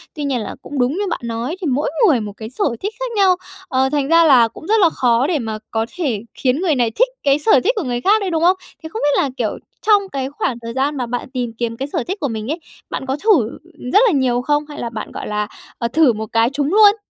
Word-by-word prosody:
Tuy 300 - -4
nhiên 275 -3 0
là - - -6
cũng 285 -1 -6
đúng 250 +2 +2
như 400 +4 -2
bạn - - -2
nói 235 +6 -3
thì 345 - -1
mỗi 280 +2 0 0.2
người 285 -9 +4
một 205 -1 -6
cái 220 0 -7
sở 255 - -3 0.2
thích 410 +3 -3
khác - - -3
nhau, 385 -3 +5 0.3
ờ, 265 +1 +1
thành 285 -1 0
ra 335 +2 +6
là 255 -6 +6
cũng 315 - -12
rất 440 +1 +3
là 355 -5 +5
khó 245 -3 +2
để 330 -3 0
mà 220 -3 -4
có 225 0 0
thể 265 - -1
khiến 265 +4 0
người 340 -5 +2
này 240 -3 +1
thích - - +3 0.2
cái 280 0 +3
sở 295 - +5
thích 480 - +3
của 415 - -1
người 245 -3 -2
khác 420 - +4
đấy, 390 - -1
đúng 330 -2 0
không? 365 +2 +5 0.3
Thì 320 - -6
không 440 - -5
biết 290 - +3
là, 280 - -1
kiểu, - - -1 0.2
trong 410 -2 +3
cái 265 -1 -2
khoảng 270 -3 -2
thời 230 0 -6
gian 280 +3 0
mà 250 - -1
bạn 245 +2 -4
tìm 245 -3 -2
kiếm 230 -1 -2
cái 270 +3 -3
sở - - 0
thích 390 +3 -3
của 285 - -1
mình 220 -3 -4
ấy, 325 - -3 0.3
bạn - - -4
có 265 +1 -2
thử 325 - +3 0.4
rất 410 - +7
là - - +3
nhiều 255 -5 +1
không 295 +3 0
hay 295 - -8
là 235 - -3
bạn, 225 -2 -6
gọi - - -6
là, 210 0 -1 0.3
ờ, 235 - -1
thử 280 0 +4
một 220 0 -4
cái 230 +1 +3
trúng 280 +1 -1
luôn? 415 -1 +7
275 Hz, 280 wpm, -19 LUFS, 240-335 Hz, 0.4 s, rất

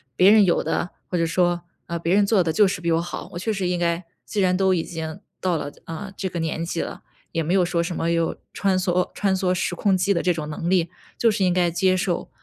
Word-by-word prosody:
别 185 +7 +6
人 215 -2 +7
有 175 - +2
的， 175 - -1 0.2
或 180 - -2
者 165 - +2
说 175 +1 +1 0.2
呃， 170 - -3
别 170 +3 +1
人 205 0 +4
做 200 -3 +3
得 165 - 0
就 205 +5 +4
是 185 -2 -3
比 170 - 0
我 165 - +2
好， 175 - -6
我 175 - -4
确 220 +4 -1
实 195 -3 -1
应 180 0 0
该 170 0 0 0.2
既 210 - -1
然 185 -1 +3
都 190 0 +3
已 170 -3 0
经 160 +2 -6 0.2
到 180 -2 0
了， 145 -2 -3
呃， 165 +5 -6
这 190 - -2
个 175 -2 -4
年 165 0 -2
纪 165 -1 -2
了， - - -6 0.3
也 165 - -1
没 170 - 0
有 190 -1 +4
说 170 -1 0
什 170 +1 -3
么， 165 - 0
有 165 -1 +1 0.2
穿 195 -2 +1
梭 180 -1 0
穿 200 -2 +1
梭 185 -1 +1
时 180 0 -1
空 195 +2 +2
机 185 +2 +2
的 170 - 0
这 180 - +2
种 155 -2 -5
能 165 +3 -3
力， 175 -3 +2 0.3
就 230 -2 +4
是 200 -2 +1
应 180 - +3
该 175 -1 +2
接 185 +2 +2
受， 180 -1 -1
180 Hz, 290 characters per minute, -23 LUFS, 170-190 Hz, 0.3 s, 人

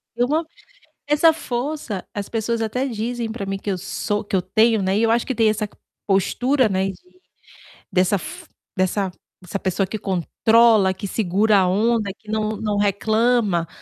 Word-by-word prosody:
Eu 245 +1 +1
não 315 +4 +1 0.6
essa 300 +2 +5
força, 255 - -4
as 205 -1 -4
pessoas 225 0 -1
até 250 +5 -1
dizem 235 -1 -3
para 215 -4 -5
mim 195 0 -3
que 200 - -4
eu 190 - 0
sou 205 +2 -3
que 200 - -2
eu 185 - +2
tenho, 220 +4 +3
né, 190 +1 0
e 220 - +2
eu 225 - +3
acho 235 +1 +2
que 260 - -2
tem 225 -1 +3
essa 215 -1 -1 0.4
postura, 245 +6 +2
né, 190 0 0
de 360 - -16 0.7
dessa 185 +1 +2
f 345 - -7 0.3
dessa 185 +1 0 0.3
dessa 185 +2 -5
pessoa 190 0 0
que 215 - -5
controla, 210 +2 +3
que 195 +2 -7
segura 205 +1 +2
a 185 -1 +3
onda, 215 +2 +1
que 215 -1 -11
não 215 0 0
não 210 -1 -2
reclama, 205 -2 +1
215 Hz, 180 wpm, -21 LUFS, 195-235 Hz, 0.7 s, essa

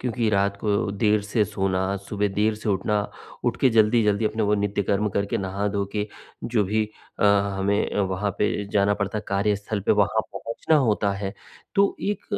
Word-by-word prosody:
क्योंकि 120 -2 -1
रात 100 0 +1
को 105 -1 0
देर 105 +1 +2
से 105 +1 +1
सोना, 95 -1 -1
सुबह 100 +1 -2
देर 110 +1 +3
से 105 0 -6
उठना, 105 +1 +1 0.4
उठ 120 - +1
के 130 - +5
जल्दी-जल्दी 110 -1 +3
अपने 110 +1 -1
वो 105 0 +2
नित्य 100 0 0
कर्म 105 +2 +1
करके, 100 +1 -1
नहा 100 +1 -2
धो 100 -1 -1
के, 105 0 -2 0.4
जो 115 -4 +1
भी 105 +2 0 0.3
अ, - - +3 0.3
हमें 100 +2 0
वहाँ 95 +1 -1
पे 105 0 0
जाना 100 0 +3
पड़ता 100 +1 -2
है - - -6
कार्यस्थल 100 +1 0
पे, - - +5
वहाँ 105 +2 +2
पहुँचना 115 +7 0
होता 105 -6 +2
है। 100 0 -4 0.4
तो 200 0 +3
एक 205 +1 -2
105 Hz, 185 wpm, -24 LUFS, 100-110 Hz, 0.4 s, के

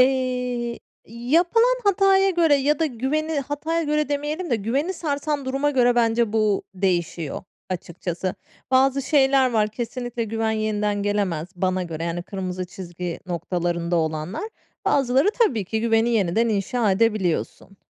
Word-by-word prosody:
Eee, 250 -2 +1 0.3
yapılan 345 - +2
hataya 390 -1 +4
göre 335 -4 +4
ya 285 +1 +2
da 325 - +2
güveni 295 +4 -1
hataya 300 +4 -2
göre 300 -1 0
demeyelim 295 +4 -2
de 235 - +3
güveni 265 - -1
sarsan 295 -4 -2
duruma 275 +3 0
göre, 245 -3 +3
bence, 230 -2 +2
bu 215 -2 +2
değişiyor, 175 -5 -1 0.3
açıkçası. 175 +1 -4 0.4
Bazı 265 +1 +3
şeyler 270 -2 +3
var, 215 -2 +2
kesinlikle 240 +1 -4
güven 225 0 -1
yeniden 210 -2 -1
gelemez 195 -6 -1
bana 185 0 0
göre, 165 -2 -5
yani, 170 +1 -3
kırmızı 185 -1 -4
çizgi 175 -1 -6
noktalarında 175 0 -1
olanlar. 160 - -2 0.4
Bazıları, 275 +3 +3
tabii 255 - +2
ki, 220 +4 -2
güveni 225 0 +2
yeniden 220 +1 +2
inşa 210 +1 +1
edebiliyorsun. 195 -2 0
235 Hz, 135 wpm, -23 LUFS, 190-280 Hz, 0.4 s, hataya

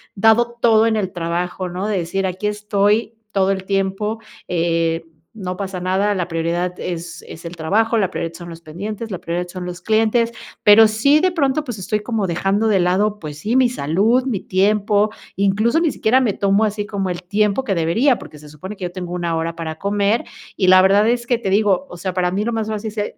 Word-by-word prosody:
dado 225 +3 +3
todo 225 -1 +5
en 225 - +1
el 195 -4 -1
trabajo, 180 +2 -3
¿no? 185 +4 -3
De 210 - 0
decir, 190 +3 -1
aquí 185 +3 -5
estoy 210 +2 0 0.2
todo 195 -1 +2
el 190 -1 -2
tiempo, 195 +3 -1 0.3
eh, 165 -1 0 0.3
no 185 -4 -5
pasa 190 -2 -4
nada, 190 +3 +1
la 180 -3 -2
prioridad 175 +2 -2
es 170 -1 -5
es 165 - -10
el 170 +1 -6
trabajo, 220 +8 +1
la 190 -4 +1
prioridad 165 -3 -4
son 175 -1 -9
los 165 0 -10
pendientes, 205 +8 -6
la 185 - -3
prioridad 175 +1 -3
son 180 0 -6
los 180 0 -7
clientes, 225 +2 +2 0.3
pero 215 +1 +8
sí 280 +8 +3
de 370 0 +2
pronto, 295 -3 0
pues, 245 -8 -6
estoy 210 +3 -2
como 215 -2 -2
dejando 195 +5 0
de 200 -3 +3
lado, 200 +4 +1
pues 150 -3 -8
sí, 220 +9 -1
mi 260 -1 +5
salud, 220 - +1
mi 230 -8 -2
tiempo, 205 +2 +2 0.3
incluso 210 +9 +2
ni 330 -3 +1
siquiera 250 +3 +2
me 230 -6 +1
tomo 200 +3 +2
así 210 0 -2
como 200 -2 -3
el 180 0 -4
tiempo 210 +5 +1
que 205 -7 -1
debería, 220 - +2
porque 150 - -12
se 150 - -14
supone 185 +8 -8
que 190 - -9
yo 175 - -4
tengo 180 -1 -6
1, 170 -2 -1
hora 165 +1 -2
para 160 -1 -5
comer, 205 +3 +1 0.3
y 185 - +1
la 185 0 +8
verdad 200 +3 +4
es 240 0 0
que 240 -2 +1
te 195 - -2
digo, 205 +5 +2
o 175 - -9
sea, 185 +1 -3
para 180 -1 +1
mí 200 +3 -1
lo 235 - -1
más 220 -1 -2
fácil 215 0 -4
se 210 -1 -4
195 Hz, 220 wpm, -20 LUFS, 180-220 Hz, 0.3 s, pero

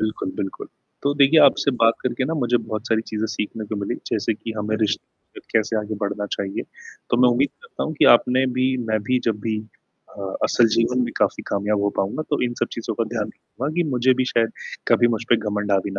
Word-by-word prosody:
बिल्कुल, 110 -3 -2
बिल्कुल। 95 -1 -5 0.3
तो 140 - +2
देखिए 145 +3 +6
आपसे 140 0 +4
बात 115 0 +6
करके 130 +1 -1
ना 160 +4 -2
मुझे 120 -4 +1
बहुत 110 0 -4
सारी 110 -1 +2
चीज़ें 110 0 -1
सीखने 105 +1 -4
को 105 +1 -4
मिली 100 - -2 0.2
जैसे 115 - 0
कि 115 +1 -6
हमें 110 +1 -1
रिश्ते 105 -1 -1 0.3
में - - -14
कैसे 110 0 +1
आगे 105 +1 -3
बढ़ना 105 0 -2
चाहिए। 95 -1 -3 0.5
तो - - +3
मैं 125 - +7
उम्मीद 130 +4 +2
करता 465 - -6
हूँ 155 - -3
कि - - +5
आपने 130 +2 0
भी 130 0 +2
मैं 110 -1 +1
भी 130 0 +3
जब 105 -2 -1
भी 110 0 -1 0.6
अ, - - -5 0.2
असल 120 - +4
जीवन 120 +2 +2
में - - -5
काफ़ी - - +1
कामयाब 100 +1 0
हो 100 - +2
पाऊँगा। 100 +10 -1
तो 145 - +1
इन 120 - -1
सब - - +2
चीज़ों - - -4
का - - 0
ध्यान - - -1
रखूँगा 140 +4 -6
कि 175 - +3
मुझे 130 0 +3
भी - - +3
शायद 115 -2 +1 0.4
कभी 120 - +5
मुझ 110 - -6
पे 120 - +7
घमंड 105 0 -1
हावी 100 +1 +1
115 Hz, 225 wpm, -22 LUFS, 105-130 Hz, 0.6 s, मैं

